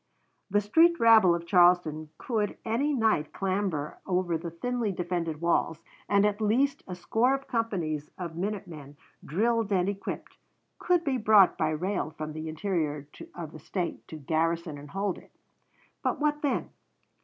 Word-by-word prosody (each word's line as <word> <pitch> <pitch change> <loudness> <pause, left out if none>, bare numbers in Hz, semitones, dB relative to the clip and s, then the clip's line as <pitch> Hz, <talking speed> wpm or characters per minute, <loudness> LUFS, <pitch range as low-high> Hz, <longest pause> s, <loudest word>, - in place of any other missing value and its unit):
The 205 +1 +2
street 330 +11 +4
rabble 220 -6 +6
of 170 0 -5
Charleston 175 -3 +3
could 215 -4 -2
any 240 +7 0
night 220 - +1
clamber 185 -6 -2
over 180 -2 0
the 165 +1 -4
thinly 235 +5 -2
defended 175 -3 -3
walls, 170 -1 0 0.3
and 200 0 +4
at 210 +1 0
least 250 +7 +2
a 180 - -5
score 235 +8 +1
of 275 0 -8
companies 175 -11 -2
of 170 -3 -6
minute 200 +3 -3
men, 145 -4 -11 0.3
drilled 225 +5 0
and 185 -2 +2
equipped, 200 -1 -5 0.4
could 355 -2 +2
be 275 -5 0
brought 210 -3 +6
by 155 - 0
rail 180 +2 -2
from 155 0 -5
the 155 +1 -5
interior 155 -4 -2 0.3
of 165 -3 -6
the 155 - -11
State 175 +3 -4
to - - -9
garrison 160 +1 -1
and 145 0 -11
hold 195 +2 -2
it. - - -20 0.7
But - - -1
what 295 0 0
then? 285 - -1
185 Hz, 160 wpm, -28 LUFS, 160-220 Hz, 0.7 s, rabble